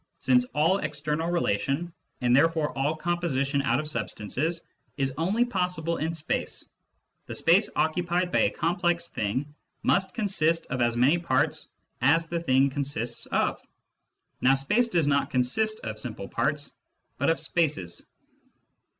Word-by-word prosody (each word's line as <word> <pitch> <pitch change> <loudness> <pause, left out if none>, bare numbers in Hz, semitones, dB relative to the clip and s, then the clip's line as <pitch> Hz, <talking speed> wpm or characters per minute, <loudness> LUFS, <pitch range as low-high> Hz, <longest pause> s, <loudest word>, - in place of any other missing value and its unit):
Since 125 -1 +3
all 160 +6 +3
external 150 +2 -2
relation, 165 +1 -1 0.3
and 120 0 +3
therefore 160 +1 +2
all 140 +3 0
composition 155 -5 0
out 125 -1 +1
of 150 - -4
substances, 140 - -2 0.3
is 135 -2 0
only 195 - +1
possible 180 -6 -1
in 160 +2 -2
space, 155 -1 -1 0.6
the - - -5
space - - +4
occupied 175 +2 0
by - - +2
a - - +4
complex 175 0 0
thing 130 +8 -3 0.3
must 190 0 +1
consist 170 -7 +1
of 125 0 -1
as 120 0 +2
many 140 +8 +4
parts 155 0 0 0.3
as 155 +6 +4
the 170 +1 -3
thing 135 -4 +3
consists 135 -4 -2
of. - - 0 0.8
Now 130 +1 +5
space 210 - +2
does 170 -9 +1
not 140 0 +1
consist 215 - +1
of 110 -1 -5
simple 110 -4 -4
parts, 145 0 -1 0.5
but 140 - +2
of 165 - +1
spaces." 145 - -1
150 Hz, 140 wpm, -27 LUFS, 130-170 Hz, 0.8 s, Now